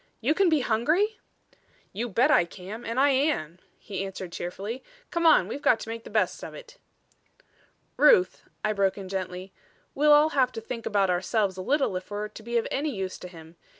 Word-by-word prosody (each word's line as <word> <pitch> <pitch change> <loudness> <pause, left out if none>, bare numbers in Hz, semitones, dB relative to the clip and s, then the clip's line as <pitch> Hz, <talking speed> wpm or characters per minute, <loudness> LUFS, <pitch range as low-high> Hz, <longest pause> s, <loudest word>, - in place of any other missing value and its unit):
"You 255 +7 +2
can 385 +1 +3
be 310 -3 +3
hungry?" 310 - +1 0.7
"You 235 +5 -3
bet 230 +5 +3
I - - +5
can 190 +6 -9
and 230 +3 -1
I 285 +1 +5
am," 260 - 0 0.2
he 195 -2 -5
answered 190 -2 -7
cheerfully. 195 +8 -5 0.3
"Come 340 -1 +2
on; - - +5
we've 285 - -5
got 225 - +3
to - - -7
make 230 0 -6
the - - -9
best - - 0
of - - -8
it." - - -13 1.2
"Ruth," 390 -7 +5 0.2
I 215 - +1
broke 200 -1 +1
in 195 -2 -7
gently, 185 0 -5 0.4
"we'll 300 +2 +3
all 295 +1 +6
have 265 -4 +2
to 225 - -4
think 230 +1 -6
about 195 -3 +2
ourselves 190 +2 0
a 185 - -6
little 270 -1 +1
if 185 - -9
we're 210 +1 -4
to 215 - -12
be 235 +2 -2
of 230 - 0
any 295 +3 -1
use 195 -7 -4
to - - -8
him. 165 -1 -14
225 Hz, 205 wpm, -27 LUFS, 190-285 Hz, 1.2 s, all